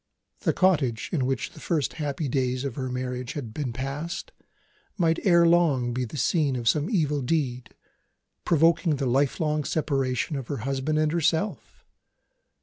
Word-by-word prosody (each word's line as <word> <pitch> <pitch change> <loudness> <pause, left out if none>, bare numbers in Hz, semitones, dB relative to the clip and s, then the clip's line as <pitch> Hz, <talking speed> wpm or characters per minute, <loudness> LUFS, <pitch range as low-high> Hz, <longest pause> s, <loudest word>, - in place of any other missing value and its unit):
The - - +1
cottage, 145 -12 +1
in 135 -6 +1
which 135 -2 -2
the - - -13
first 155 -7 -1
happy 145 +1 -2
days 130 0 0
of 135 - -3
her 130 0 -4
marriage 125 0 -4
had 120 -7 -6
been 140 -3 -3
passed, 140 - -5 0.7
might 165 -3 +2
ere 170 -3 +5
long 155 -8 +3
be 125 +1 -1
the 125 - -8
scene 145 0 +1
of 120 -2 -3
some 150 - +2
evil 150 -9 +1
deed, 130 -3 -2 0.7
provoking 165 0 +3
the 140 -1 -2
lifelong 145 +4 +1
separation 135 -2 -1
of 130 -3 -6
her 145 - -3
husband 135 +3 -1
and 155 0 +2
herself! 170 +4 -1
145 Hz, 155 wpm, -26 LUFS, 130-160 Hz, 0.7 s, ere